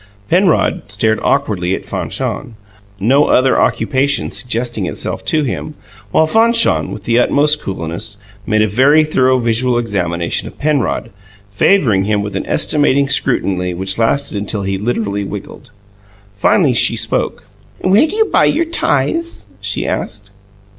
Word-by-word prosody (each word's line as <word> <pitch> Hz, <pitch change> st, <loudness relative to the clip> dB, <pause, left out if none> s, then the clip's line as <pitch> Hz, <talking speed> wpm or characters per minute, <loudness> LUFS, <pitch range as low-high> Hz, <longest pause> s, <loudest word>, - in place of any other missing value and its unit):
Penrod 180 Hz, 0 st, +2 dB
stared 110 Hz, +1 st, +1 dB
awkwardly 100 Hz, -10 st, 0 dB
at -, -, -8 dB
Fanchon, 115 Hz, -, -4 dB, 0.4 s
no 135 Hz, +9 st, +3 dB
other 130 Hz, +1 st, +3 dB
occupation 140 Hz, +1 st, 0 dB
suggesting 120 Hz, -5 st, -2 dB
itself -, -, -4 dB
to 155 Hz, -1 st, +1 dB
him, 145 Hz, +3 st, -4 dB, 0.3 s
while 160 Hz, -, +3 dB
Fanchon, 230 Hz, +6 st, +2 dB
with 105 Hz, -, -8 dB
the 115 Hz, +2 st, +2 dB
utmost 150 Hz, +4 st, +2 dB
coolness, 95 Hz, +3 st, -5 dB, 0.3 s
made 110 Hz, 0 st, +2 dB
a -, -, +2 dB
very 135 Hz, +9 st, +4 dB
thorough 130 Hz, -4 st, +2 dB
visual 120 Hz, +1 st, +1 dB
examination 90 Hz, -7 st, -1 dB
of -, -, -12 dB
Penrod, 140 Hz, -6 st, -1 dB, 0.4 s
favouring 105 Hz, -, +2 dB
him 105 Hz, -1 st, 0 dB
with 105 Hz, -, -6 dB
an -, -, -3 dB
estimating 140 Hz, -2 st, +2 dB
scrutiny 90 Hz, -10 st, 0 dB
which 95 Hz, +3 st, -3 dB
lasted 115 Hz, +2 st, +1 dB
until 100 Hz, 0 st, -3 dB
he 95 Hz, 0 st, -2 dB
literally 100 Hz, -1 st, -2 dB
wiggled. 100 Hz, +1 st, -8 dB, 0.7 s
Finally, 100 Hz, -, +3 dB
she -, -, +2 dB
spoke. -, -, -2 dB, 0.4 s
"Where 200 Hz, +11 st, +4 dB
do 400 Hz, -, -6 dB
you 440 Hz, 0 st, +3 dB
buy -, -, +2 dB
your 335 Hz, -, +1 dB
ties?" 335 Hz, 0 st, -1 dB, 0.2 s
she -, -, -2 dB
asked. -, -, -4 dB
120 Hz, 140 wpm, -15 LUFS, 100-145 Hz, 0.7 s, very